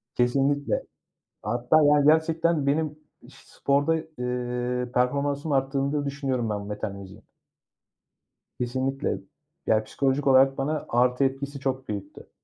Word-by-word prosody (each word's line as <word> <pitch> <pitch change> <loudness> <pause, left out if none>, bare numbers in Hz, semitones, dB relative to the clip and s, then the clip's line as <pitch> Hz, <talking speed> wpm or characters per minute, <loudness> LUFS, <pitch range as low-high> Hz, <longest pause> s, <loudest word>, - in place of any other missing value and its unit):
Kesinlikle. 135 +3 +1 0.6
Hatta 120 +8 +2
yani 145 0 +5
gerçekten 160 -1 +2
benim 150 +1 0 0.3
ş - - -17
sporda, 140 +3 +1 0.3
ııı, 125 0 -2
performansımı 140 +3 0
arttırdığını 135 +1 0
da 145 -1 -1
düşünüyorum 135 -5 -2
ben 105 -1 -2
metal 105 0 -4
müziğin. 100 +2 -11 1.4
Kesinlikle. 130 -1 -1 0.5
Yani 110 0 +2
psikolojik 135 +3 -1
olarak 135 0 +5
bana 150 +3 -2
artı 125 +2 +2
etkisi 140 +1 -3
çok 130 -1 -3
büyüktü. 100 -2 -7
135 Hz, 115 wpm, -26 LUFS, 125-145 Hz, 1.4 s, yani